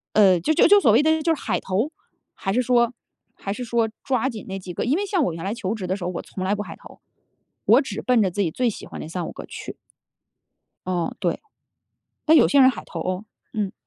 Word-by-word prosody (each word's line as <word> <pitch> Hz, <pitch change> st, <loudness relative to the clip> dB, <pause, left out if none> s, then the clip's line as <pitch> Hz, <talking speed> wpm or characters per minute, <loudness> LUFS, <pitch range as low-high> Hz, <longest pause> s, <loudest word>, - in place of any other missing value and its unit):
呃， 195 Hz, -4 st, +6 dB
就 175 Hz, -, +1 dB
就 325 Hz, -, +5 dB
就 410 Hz, -, +8 dB
所 225 Hz, -, +5 dB
谓 240 Hz, -, +5 dB
的 315 Hz, +1 st, +2 dB
就 325 Hz, +1 st, +2 dB
是 -, -, -10 dB
海 -, -, -1 dB
投， 205 Hz, +10 st, -1 dB, 0.4 s
还 195 Hz, -, -3 dB
是 245 Hz, -, +2 dB
说 240 Hz, 0 st, +3 dB, 0.4 s
还 195 Hz, -, -5 dB
是 245 Hz, +4 st, -5 dB
说 230 Hz, -1 st, +1 dB, 0.2 s
抓 260 Hz, -1 st, +1 dB
紧 225 Hz, -5 st, -7 dB
那 195 Hz, -, -4 dB
几 185 Hz, -1 st, -8 dB
个。 -, -, -2 dB
因 265 Hz, +6 st, +2 dB
为 405 Hz, -, -1 dB
像 370 Hz, -7 st, +1 dB
我 -, -, -1 dB
原 165 Hz, 0 st, -7 dB
来 200 Hz, +3 st, -2 dB
求 220 Hz, -3 st, -3 dB
职 190 Hz, -4 st, -5 dB
的 185 Hz, -, -1 dB
时 195 Hz, -, -6 dB
候， 180 Hz, -, -1 dB
我 180 Hz, -, -5 dB
从 185 Hz, -, -6 dB
来 195 Hz, +2 st, +1 dB
不 210 Hz, -, -3 dB
海 -, -, -9 dB
投， -, -, -15 dB, 0.6 s
我 -, -, +6 dB
只 215 Hz, -5 st, -5 dB
奔 250 Hz, -2 st, +3 dB
着 190 Hz, -3 st, +2 dB
自 205 Hz, -, -4 dB
己 170 Hz, -, 0 dB
最 245 Hz, +8 st, 0 dB
喜 -, -, -9 dB
欢 -, -, -8 dB
那 -, -, -7 dB
3、5 170 Hz, 0 st, -4 dB
个 -, -, -9 dB
去。 -, -, -8 dB, 1.1 s
哦， 175 Hz, -2 st, -1 dB
对。 -, -, -1 dB, 0.8 s
但 320 Hz, +1 st, +6 dB
有 -, -, +7 dB
些 285 Hz, -, +5 dB
人 260 Hz, 0 st, +8 dB
海 255 Hz, -, -7 dB
投 165 Hz, -, -6 dB
哦。 185 Hz, +4 st, -3 dB, 0.3 s
嗯。 205 Hz, -3 st, -2 dB
215 Hz, 265 characters per minute, -23 LUFS, 185-255 Hz, 1.1 s, 就